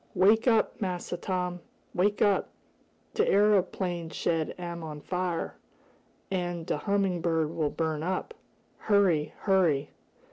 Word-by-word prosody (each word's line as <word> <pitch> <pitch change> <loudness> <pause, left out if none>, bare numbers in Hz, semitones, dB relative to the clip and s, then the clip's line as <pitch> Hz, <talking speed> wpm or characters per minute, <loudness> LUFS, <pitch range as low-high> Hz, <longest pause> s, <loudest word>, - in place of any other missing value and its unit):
"Wake 215 +6 +4
up, 225 -2 +2
Massa 180 -2 -2
Tom! 180 -1 -2 0.3
Wake 200 +3 +2
up! 200 -2 +2 0.6
De - - +2
areoplane 185 -4 +2
shed 160 -2 -1
am 170 -1 -5
on 155 -2 -6
fire, 180 +1 -3 0.7
an' 175 -2 -2
de - - -1
Humming 195 +1 0
Bird 160 -2 +1
will 155 -3 0
burn 160 -1 -2
up! 185 - -2 0.5
Hurry! 190 -8 +2
Hurry!" 175 -8 +2
180 Hz, 120 wpm, -28 LUFS, 165-195 Hz, 0.7 s, Wake